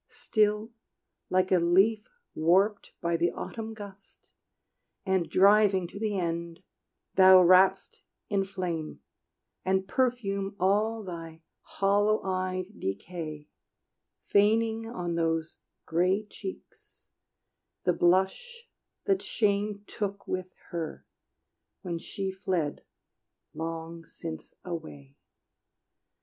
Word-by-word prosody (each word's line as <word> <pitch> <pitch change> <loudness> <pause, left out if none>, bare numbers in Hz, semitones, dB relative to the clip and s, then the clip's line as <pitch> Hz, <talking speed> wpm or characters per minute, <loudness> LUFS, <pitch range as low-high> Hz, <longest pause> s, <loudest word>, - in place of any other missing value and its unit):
Still, 215 -3 0 0.6
like 185 0 +2
a 185 - +5
leaf 195 +6 +3 0.2
warped 190 +6 +2
by 170 0 +1
the 170 +1 +2
autumn 225 -1 -6
gust, 200 -2 -13 0.7
And 190 -3 +1
driving 200 -1 +5
to 200 - -9
the 210 -2 -1
end, 170 -1 -3 0.5
thou 185 -1 +8
wrapp'st 185 +2 +4 0.3
in 200 -1 +1
flame 180 -5 -4 0.6
And 190 0 +1
perfume 200 -5 -1
all 210 +4 +1
thy 165 -3 -8 0.2
hollow 205 +2 +1
eyed 185 +1 -3
decay, 155 - -5 0.8
Feigning 225 +2 +2
on 180 -7 -4
those 165 -1 -1 0.3
gray 185 +5 +1
cheeks 375 - -11 0.7
the 180 - +3
blush 190 - +1 0.4
that 390 -2 +2
Shame 205 -1 0
Took 200 -1 -5
with 185 0 -3 0.2
her 165 -3 -5 0.8
when 170 -3 -3
she 195 +2 -4
fled 185 -6 -2 0.7
long 165 0 -6
since 160 +1 -8
away. 75 - -7
190 Hz, 100 wpm, -28 LUFS, 170-205 Hz, 0.8 s, thou